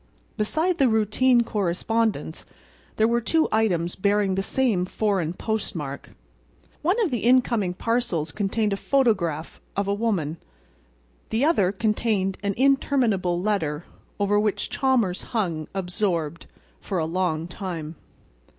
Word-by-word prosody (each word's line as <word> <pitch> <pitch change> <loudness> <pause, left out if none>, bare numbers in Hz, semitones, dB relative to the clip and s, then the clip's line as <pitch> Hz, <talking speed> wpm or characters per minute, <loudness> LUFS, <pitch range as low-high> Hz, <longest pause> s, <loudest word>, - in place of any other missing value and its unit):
Beside 315 +11 0
the 270 -3 +5
routine 230 +3 +3
correspondence 215 +2 -1 0.5
there 220 - +3
were 235 +1 +1
two 320 +7 +2
items 180 -6 +1
bearing 200 0 +1
the 190 - 0
same 220 -3 +1
foreign 195 -6 0
postmark. 175 -8 -4 0.7
One 365 +9 +1
of 355 - 0
the 240 - 0
incoming 235 -6 +2
parcels 230 -9 -1
contained 210 0 0
a - - -2
photograph 190 - 0 0.2
of 200 0 0
a 200 - +1
woman. 195 -8 -1 0.9
The 230 +6 +1
other 200 - +3
contained 210 -2 0
an 200 -1 -1
interminable 245 -9 +2
letter, 175 -6 -1 0.3
over 205 +1 +2
which 210 -1 -1
Chalmers 240 -9 +1 0.2
hung, 165 -7 -1
absorbed, 180 -4 -2 0.3
for 195 - -4
a 160 - 0
long 165 -1 -1
time. 175 -4 -5
205 Hz, 125 wpm, -24 LUFS, 180-230 Hz, 0.9 s, the